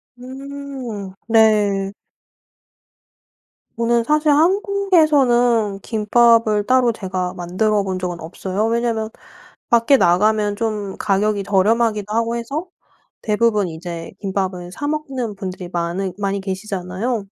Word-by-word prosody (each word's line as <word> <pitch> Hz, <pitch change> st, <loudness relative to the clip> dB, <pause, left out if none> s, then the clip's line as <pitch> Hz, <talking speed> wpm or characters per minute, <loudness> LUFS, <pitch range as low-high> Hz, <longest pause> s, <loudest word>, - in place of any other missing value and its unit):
음. 260 Hz, -5 st, -7 dB, 0.2 s
네. 210 Hz, -3 st, +3 dB, 1.8 s
저는 235 Hz, 0 st, +1 dB
사실 300 Hz, 0 st, +3 dB
한국에서는 295 Hz, -, +3 dB
김밥을 220 Hz, -1 st, +3 dB
따로 255 Hz, -2 st, +3 dB
제가 185 Hz, -4 st, -3 dB
만들어 200 Hz, +4 st, 0 dB
본 185 Hz, -1 st, -3 dB
적은 180 Hz, -2 st, -4 dB
없어요. 190 Hz, +5 st, -3 dB
왜냐하면 230 Hz, -1 st, -1 dB, 0.6 s
밖에 235 Hz, +4 st, +5 dB
나가면 205 Hz, +2 st, +2 dB
좀 210 Hz, -3 st, -3 dB
가격이 205 Hz, 0 st, 0 dB
저렴하기도 210 Hz, +1 st, +1 dB
하고 230 Hz, +1 st, 0 dB
해서 275 Hz, +9 st, -4 dB, 0.6 s
대부분 210 Hz, -2 st, +1 dB
이제 165 Hz, 0 st, -7 dB
김밥을 190 Hz, -2 st, -3 dB
사 290 Hz, +9 st, -5 dB
먹는 270 Hz, -8 st, -3 dB
분들이 185 Hz, -2 st, -6 dB
많으 175 Hz, +2 st, -2 dB
많이 200 Hz, -1 st, -2 dB
계시잖아요. 195 Hz, +3 st, -3 dB
215 Hz, 250 characters per minute, -20 LUFS, 195-240 Hz, 1.8 s, 밖에